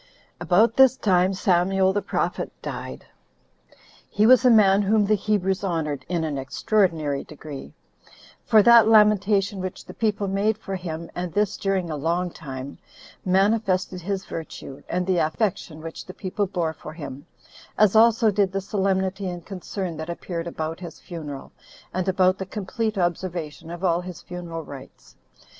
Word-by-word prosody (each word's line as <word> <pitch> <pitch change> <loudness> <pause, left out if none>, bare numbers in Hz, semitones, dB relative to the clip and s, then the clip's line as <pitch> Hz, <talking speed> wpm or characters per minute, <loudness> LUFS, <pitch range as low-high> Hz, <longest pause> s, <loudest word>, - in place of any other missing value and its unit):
5. - - -31
About 220 +6 +4
this 265 -1 +6
time 185 -4 +3
Samuel 190 0 +2
the 205 - 0
prophet 195 - -2
died. - - -6 1.0
He 210 - +2
was 255 +2 +7
a 250 - +6
man 205 -3 +6
whom 205 +1 +3
the 210 - +2
Hebrews 200 -2 0
honored 155 -7 -2
in 175 -2 0
an 150 -3 -2
extraordinary 155 -1 0
degree: 145 - -10 0.7
for 215 -2 +5
that 235 -1 +7
lamentation 210 -2 +4
which 185 -1 -6
the 185 - -10
people 210 -2 -1
made 200 +3 +1
for 195 -3 -5
him, 170 -2 -6
and 175 -1 -4
this 205 -1 +1
during 190 -4 -1
a - - -2
long 170 +4 -1
time, 135 -2 -8 0.4
manifested 190 -1 +1
his 195 +2 -3
virtue, 155 -4 -8
and 180 +1 -1
the 185 -2 +1
affection 160 -1 -1
which 165 0 -7
the 185 - -9
people 200 +1 -2
bore 170 -4 -2
for 155 - -10
him; 145 -1 -8 0.5
as 210 -1 +4
also 225 0 +5
did 200 -2 +1
the 195 - 0
solemnity 190 -1 -1
and 175 -2 -7
concern 185 -2 -5
that 160 +2 -6
appeared 170 0 -5
about 160 0 -4
his 175 -3 -9
funeral, 150 -6 -8 0.4
and 185 +1 -1
about 185 0 +3
the 190 - -3
complete 215 +2 -3
observation 175 -3 -3
of 175 +2 -7
all 175 -1 +2
his 180 -2 -8
funeral 175 -2 -6
rites. 140 -3 -12
185 Hz, 160 wpm, -24 LUFS, 165-205 Hz, 1.0 s, was